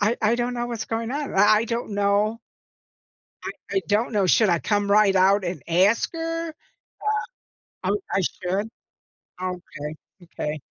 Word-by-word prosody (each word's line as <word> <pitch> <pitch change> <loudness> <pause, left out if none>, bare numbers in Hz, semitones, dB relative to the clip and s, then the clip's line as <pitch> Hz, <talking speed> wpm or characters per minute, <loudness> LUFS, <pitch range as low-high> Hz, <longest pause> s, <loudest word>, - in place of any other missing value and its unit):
I 215 +4 +2
I 220 +2 +4
don't 245 +1 -1
know 240 0 -2
what's 235 -2 -4
going 225 +1 -2
on, 290 +1 -3
I 200 +2 +6
I 220 - +1
don't 235 0 -3
know 205 +2 +1 1.0
I - - -2 0.2
I 385 - +2
don't 215 +4 +1
know, 205 -3 +2
should 215 +4 +4
I 170 -2 +3
come 205 -1 0
right 200 -1 +5
out 195 +1 +4
and 175 -5 -4
ask 185 +7 +3
her? 330 0 -3 1.3
Um - - +1
oh, - - 0
I 195 - +2
should? 190 +3 -2 0.7
Okay, 175 -5 -5 0.3
okay. 155 -3 -4
205 Hz, 160 wpm, -24 LUFS, 185-230 Hz, 1.3 s, I